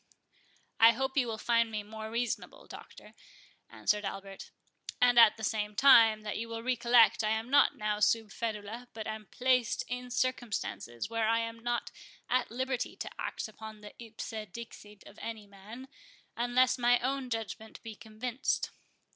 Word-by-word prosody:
"I 230 +1 +8
hope 265 +3 -2
you 260 -4 +2
will 225 -1 -3
find 230 0 +2
me 215 -1 -4
more 220 +1 -8
reasonable, 235 +1 -3
Doctor," - - -13 0.6
answered 210 0 0
Albert; 195 0 -7 0.5
"and 245 -1 +5
at 230 -2 +7
the 220 - -9
same 210 -1 -2
time, 225 -5 +6
that 210 0 -4
you 230 +1 -5
will 230 0 -5
recollect 240 -2 +4
I 215 - +1
am 220 +3 -2
not 285 - +5
now 210 0 -1
sub 210 0 +2
ferula, 225 +2 -5
but 220 -1 -5
am 215 -1 -6
placed 250 -2 +1
in 250 0 -5
circumstances 240 - -2
where 225 -1 0
I 230 - +3
am 230 0 -5
not 240 +1 -2 0.4
at 255 0 +2
liberty 260 +1 -3
to - - -6
act - - -4
upon 220 0 -11
the 210 - -11
ipse 225 0 -8 0.2
dixit 210 -2 -11
of 200 - -14
any 225 -2 -6
man, 205 +6 -12 0.5
unless 245 +2 +2
my 245 0 +4
own 265 +1 -2
judgment 220 -1 -5
be 225 -1 -7
convinced. 230 +4 -3
230 Hz, 165 wpm, -31 LUFS, 215-245 Hz, 0.6 s, I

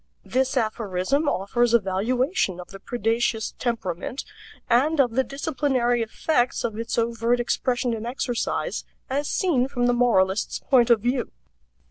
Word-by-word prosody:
This 265 +1 0
aphorism 220 +5 0
offers 235 +4 +1
a - - +6
valuation 210 - 0
of 180 - -9
the 195 - -10
predaceous 230 0 -1
temperament, 230 0 -3 0.4
and 280 +6 +3
of 250 -4 +4
the 260 +3 +2
disciplinary 260 -2 0
effects 245 +3 0
of 225 -3 -2
its 230 0 -3
overt 230 +1 +1
expression 245 0 0
and 225 +1 -4
exercise, 245 - -2 0.3
as 285 +2 0
seen 285 -10 +1
from 245 -3 -1
the 245 - +3
moralist's 205 -5 +2
point 245 -3 +3
of 235 -3 +5
view. 245 +2 -1
240 Hz, 140 wpm, -24 LUFS, 225-255 Hz, 0.4 s, a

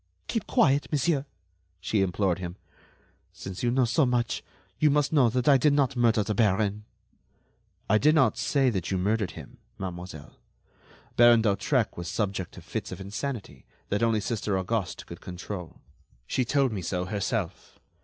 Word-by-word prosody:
"Keep 225 - -2
quiet, 140 -1 +3
monsieur," 145 -1 +1 0.5
she 100 +3 0
implored 95 -1 0
him. 90 -1 -5 0.8
"Since 95 -1 -7
you 120 - +1
know 125 +1 +3
so 120 +6 +2
much, 125 -2 0 0.4
you 155 - +5
must 145 +1 +2
know 135 -6 +5
that 125 +1 -1
I 140 -2 +7
did 145 +2 +3
not 140 -2 +2
murder 115 -3 +3
the 105 - -2
baron." 105 0 +1 1.0
"I 110 +2 +4
did 150 +5 +4
not 155 - +4
say 135 -3 +2
that 95 -5 -3
you 95 - 0
murdered 105 +1 0
him, - - -11 0.2
mademoiselle. 90 -5 -8 0.8
Baron 120 -1 +7
d'Hautrec 110 +3 +1
was 85 0 -5
subject 95 -4 -2
to - - -11
fits - - -5
of - - -6
insanity 100 - -6 0.2
that 105 - 0
only 115 -2 +2
Sister 105 -2 -1
Auguste 95 -1 -2
could - - -10
control. 90 -1 -7 0.4
She 125 - 0
told 135 +1 +2
me 100 -4 -3
so 90 +1 -2
herself. 100 -1 -3
110 Hz, 165 wpm, -27 LUFS, 95-130 Hz, 1.0 s, I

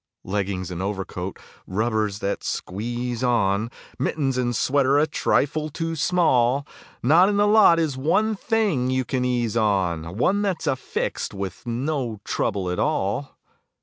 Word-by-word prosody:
Leggings 95 -2 -2
and 90 0 -4
overcoat, 95 -2 -4 0.3
rubbers 110 0 0
that 100 - -2
squeeze 120 +4 -3
on, 115 -3 +1 0.3
Mittens 135 0 0
and 120 -1 0
sweater 140 +3 +2
a 150 - +4
trifle 155 0 0
too 165 +2 -3
small; 140 -6 +2 0.4
Not 165 - +6
in 205 - 0
the 205 - +4
lot 210 -5 +6
is 155 -5 0
one 215 +10 +2
thing 200 - 0
you 130 0 0
can 130 0 -1
ease 120 -3 0
on, 95 -6 0
One 190 - +2
that's 195 -4 -1
affixed 130 -5 -2
with 95 +3 -6
no 120 -2 -2
trouble 95 -3 -1
at 90 - -3
all. 140 -2 -1
125 Hz, 145 wpm, -23 LUFS, 100-155 Hz, 0.4 s, Not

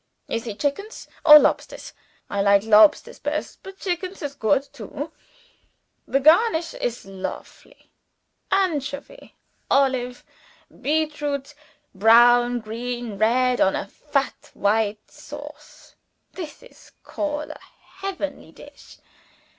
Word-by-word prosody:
Is 230 +1 -3
he 220 -3 -5
chickens 300 - -4 0.2
or 300 -1 +11
lobsters? - - 0 0.3
I 200 - -2
like 200 0 +4
lobsters 220 +6 +4
best, - - -4
but 385 0 -11
chickens 365 -1 -4
is 285 -1 -4
goot 275 +2 +1
too. 285 +5 -7 1.0
The 275 - +1
garnish 330 - +4
is 240 -3 -4
lofely 195 - -9 0.6
anchovy, 360 - -2 0.3
olive, 260 -3 +1 0.6
beetroots; 295 -2 -2 0.4
brown, 240 +3 +5
green, 230 -1 -5
red, 250 +3 +2
on 190 - +3
a - - -3
fat 275 +5 -3
white 210 +1 0
sauce! - - -12 0.4
This 330 -1 -8
I - - -20
call 300 0 -3
a - - -11 0.4
heavenly 380 -7 -5
dish. - - -15
275 Hz, 105 wpm, -23 LUFS, 225-305 Hz, 1.0 s, or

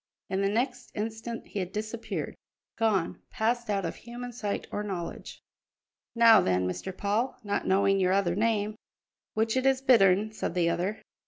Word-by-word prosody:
In 190 +1 +1
the 195 - +2
next 245 +4 -1
instant 225 +2 -4
he 205 - -4
had 180 -1 -3
disappeared 215 +2 -4 0.4
gone, 210 -6 0
passed 235 +1 -1
out 200 -3 0
of 165 - -4
human 245 +1 -7
sight 210 -4 -3
or 205 - -2
knowledge. 185 -5 -6 0.7
"Now 230 -2 +8
then, 90 0 +1
Mr. 185 - -5
Paul 215 +6 0
not 205 -1 -2
knowing 195 +1 +3
your 185 -1 +3
other 190 -3 +2
name 215 0 +1 0.3
" - - -65
"Which 220 +1 +1
it 260 +1 +2
is 265 -1 +3
Bittern," 215 -6 +4
said 200 - -3
the 170 -1 +3
other. 190 +6 -2
210 Hz, 170 wpm, -28 LUFS, 190-230 Hz, 0.7 s, Now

